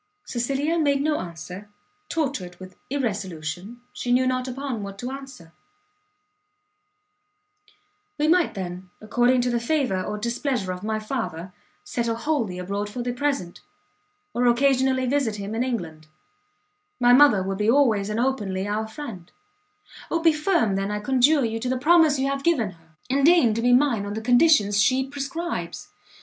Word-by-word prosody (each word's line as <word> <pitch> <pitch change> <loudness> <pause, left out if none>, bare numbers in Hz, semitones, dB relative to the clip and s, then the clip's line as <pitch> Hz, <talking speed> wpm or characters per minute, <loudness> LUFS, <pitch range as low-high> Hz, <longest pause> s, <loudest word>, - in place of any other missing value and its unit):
Cecilia 275 +7 -1
made 285 -3 +2
no 305 0 +1
answer; 180 +4 -8 0.4
tortured 265 - -2
with 185 -1 -11
irresolution, 200 - -4
she 245 - -3
knew 255 +1 +3
not 255 0 -1
upon 260 -3 -4
what 200 -1 -7
to 245 - -7
determine. 265 -10 -8 2.7
"We 300 +1 +1
might 345 -5 +3
then, 180 -1 -6
according 245 +3 +2
to 245 0 0
the 240 - +1
favour 235 -7 0
or 210 +3 -4
displeasure 235 -3 -2
of 180 - -8
my 215 0 -1
father, 215 -7 -5 0.3
settle 235 -1 -2
wholly 230 -7 -1
abroad 200 +3 -3
for 240 +3 -5
the 245 0 -2
present, 275 -10 -2 0.7
or 245 +1 +1
occasionally 260 +1 +3
visit 255 -4 0
him 200 +1 -6
in 230 +2 0
England; 165 -11 -4 0.9
my 245 0 +5
mother 250 -8 +6
would 195 +1 -3
be 210 +1 +2
always 230 -6 +3
and 215 +2 -2
openly 205 -7 -1
our 215 +1 -2
friend 220 - -9 0.8
Oh 335 - 0
be 325 -1 +4
firm, 305 - +1
then, 195 +1 -2
I 210 0 -2
conjure 265 +5 +3
you, 225 0 -2
to 250 +2 -3
the 260 - 0
promise 310 +1 +4
you 265 - 0
have 275 0 -2
given 270 - +1
her, 165 -2 -23
and 275 +2 +1
deign 315 -8 +5
to 230 - -2
be 245 +1 +3
mine 245 -6 +3
on 205 - -4
the 220 - -4
conditions 240 -4 +4
she 260 +3 +2
prescribes. 285 +5 -5
240 Hz, 160 wpm, -24 LUFS, 200-275 Hz, 2.7 s, mother